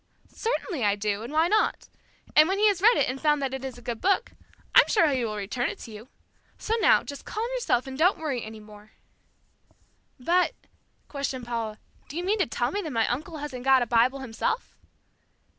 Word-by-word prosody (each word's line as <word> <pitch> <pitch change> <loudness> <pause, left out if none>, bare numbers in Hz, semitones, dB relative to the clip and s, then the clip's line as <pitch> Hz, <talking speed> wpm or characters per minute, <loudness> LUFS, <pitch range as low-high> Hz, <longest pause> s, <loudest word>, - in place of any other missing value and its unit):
"Certainly 385 - -2
I 205 -1 +3
do, 205 0 -2
and 235 +4 -7
why 320 +2 +3
not? 430 +3 +1 0.5
And 310 +3 +7
when 385 - 0
he 425 +1 +4
has 390 -3 -1
read 460 +4 +6
it - - +2
and 260 +1 -4
found 300 -1 +3
that 270 -2 -2
it 265 0 -5
is 265 -2 -6
a 245 - -14
good 235 -1 -5
book, 390 +1 +1 0.4
I'm - - +7
sure 335 -7 +4
he 260 -3 0
will 215 -2 -3
return 210 +5 -2
it - - -7
to 230 - -9
you. 215 +3 -11 0.5
So 440 - -3
now, - - +4
just 285 -1 -8
calm 440 +2 -3
yourself 470 - 0
and 265 +1 -7
don't 360 +4 +4
worry 280 -7 -3
any 220 0 -9
more." 210 0 -15 1.3
"But," 350 +8 +2 0.5
questioned 275 -3 -4
Paula, 230 -3 -4 0.3
"do 295 - -8
you 350 - -2
mean 410 +4 0
to 375 - +2
tell - - -1
me 410 - -2
that 325 - -5
my 230 -5 +1
uncle 310 +6 -4
hasn't 285 -4 -6
got 265 -1 +5
a - - -2
Bible 245 +4 +2
himself?" 265 - -3
265 Hz, 210 wpm, -26 LUFS, 235-345 Hz, 1.3 s, And